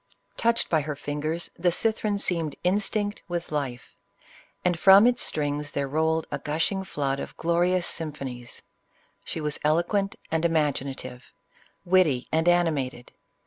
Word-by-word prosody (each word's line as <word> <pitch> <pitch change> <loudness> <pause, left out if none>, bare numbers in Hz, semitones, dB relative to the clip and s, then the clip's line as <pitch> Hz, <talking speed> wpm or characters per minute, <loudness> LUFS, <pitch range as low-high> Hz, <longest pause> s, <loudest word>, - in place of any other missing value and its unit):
CLEOPATRA. - - -7
17 - - -6
Touched - - -2
by 160 -2 +3
her 150 0 -4
fingers, 150 +4 -3
the 175 +1 +3
cithern 215 +2 0
seemed 165 -6 -1
instinct 205 +2 0
with 175 -2 -4
life, 135 -5 -4 0.7
and 175 -2 +1
from 195 +3 +8
its 245 0 +3
strings 145 -1 -1
there 140 -1 -1
rolled 160 +2 +1
a - - -2
gushing 165 +6 -1
flood 140 -6 -2
of - - -7
glorious 175 +2 +1
symphonies. 135 -7 -5 0.6
She - - -5
was 150 -2 -3
eloquent 175 +7 +1 0.2
and 160 0 0
imaginative, 140 -6 -1 0.5
witty 175 -9 +3
and 160 +2 +3
animated. 150 -8 0
160 Hz, 145 wpm, -26 LUFS, 145-180 Hz, 0.7 s, from